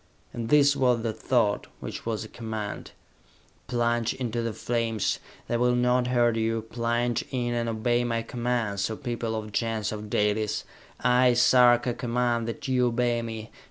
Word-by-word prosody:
And 115 -1 -4
this 145 -1 +5
was 125 -4 +2
the 115 -2 -1
thought, 105 -4 +1
which - - -7
was 110 -1 -2
a - - -8
command. 110 -2 -5 0.8
"Plunge 120 -1 0
into 120 -3 -2
the 115 0 -2
flames! 115 -1 -1 0.3
They 120 - 0
will 125 +1 +2
not 125 0 +2
hurt 120 -2 +2
you! 115 0 0
Plunge 120 +1 -1
in, 120 -2 -1
and 120 -1 -1
obey 120 +2 +1
my 115 -1 -1
commands, 115 -5 -1
O 110 - -4
people 120 -4 -3
of 110 -1 -3
the 105 - -10
Gens 110 -2 -1
of 105 -1 -6
Dalis! 105 +1 0 0.4
I, 125 0 +4
Sarka, 120 0 +5
command 120 -1 0
that 115 +4 -5
you 125 -1 +2
obey 120 0 +1
me! 110 -1 -6
120 Hz, 165 wpm, -27 LUFS, 110-125 Hz, 0.8 s, this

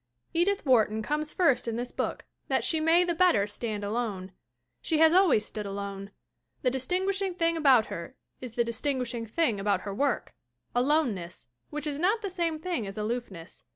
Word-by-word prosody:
Edith 380 +3 +1
Wharton 220 -4 +3
comes 300 +5 -2
first 325 -10 +2
in 230 - -1
this 245 +1 -4
book - - -3 0.2
that - - +1
she 320 - +1
may 325 +3 +4
the 350 -1 0
better 335 - +4
stand 210 0 -4
alone. 205 -3 -3 0.5
She 320 - 0
has 320 +1 +6
always 350 - +4
stood 210 -1 -5
alone. 200 0 -5 0.5
The 250 - +3
distinguishing 370 +8 -1
thing 335 -1 +1
about 270 -8 +5
her 170 +10 -7 0.2
is 250 -3 -7
the 235 - +2
dis 235 0 -4
tinguishing 250 -5 -2
thing 235 -6 +1
about 200 +1 +1
her 200 - -5
work 275 +2 -1 0.4
aloneness. 245 - 0 0.2
which 300 0 -5
is 290 -1 -3
not 415 +6 +1
the 400 - -3
same 335 -3 -1
thing 310 - -3
as 195 - -8
aloofness. 210 -6 -5
255 Hz, 180 wpm, -28 LUFS, 215-330 Hz, 0.5 s, has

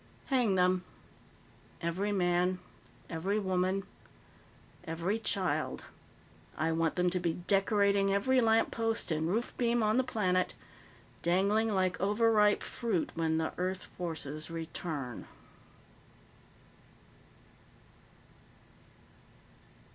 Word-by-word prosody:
"Hang 240 -7 +3
them. 180 0 +3 1.0
Every 180 +5 -1
man, 180 -1 +2 0.5
every 185 +6 -1
woman, 190 -1 0 1.0
every 170 +7 -2
child. 195 -4 -1 0.7
I 160 +2 +1
want 165 0 0
them 180 0 +2
to 180 - 0
be 170 -2 -1
decorating 200 +1 +2
every 255 +6 +3
lamppost 225 -2 +1
and 160 0 0
roof 225 +6 -1
beam 235 -1 +2
on 215 +2 +2
the 260 - +4
planet, 185 -7 0 0.7
dangling 200 +6 +2
like 185 -3 0
overripe 210 +1 +3
fruit 225 -9 -2
when 160 -1 0
the 160 0 -1
Earth 185 +1 -2
forces 155 -3 -5
return." 160 -6 -5
185 Hz, 95 wpm, -31 LUFS, 170-210 Hz, 1.0 s, the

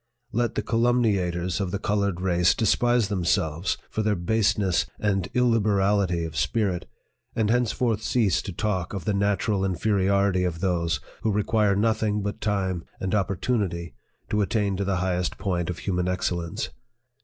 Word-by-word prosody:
Let 120 0 0
the - - -1
calumniators 100 -7 +1
of 95 - -1
the 100 - -2
colored 100 -2 0
PREFACE. 90 - -7
VU 90 -2 +1
race 85 -1 +4
despise 120 +1 +2
themselves 85 -3 0
for 110 - -2
their 105 -1 +1
baseness 100 0 +1
and 95 -3 0
illib 120 -2 +3
erally 100 -4 +1
of 80 -1 -7
spirit, 95 - 0 0.5
and 110 -1 +1
henceforth 120 -2 +1
cease 110 -4 +1
to 100 - -6
talk 95 0 -2
of 90 -5 -5
the 105 - +1
natural 100 0 +1
inferiority 95 0 +2
of 85 -2 -2
those 85 -4 0 0.2
who 110 - +1
require 105 0 +2
nothing 105 -1 +1
but 105 0 -4
time 95 -5 -1 0.2
and 95 -1 -2
opportunity 95 - -1 0.4
to 105 - +2
attain 100 -1 0
to 100 - -1
the 95 -1 0
highest 90 -1 -1
point 90 -3 -1
of 90 - -3
human 90 0 -1
excellence. 90 -2 -2
100 Hz, 160 wpm, -25 LUFS, 90-105 Hz, 0.5 s, race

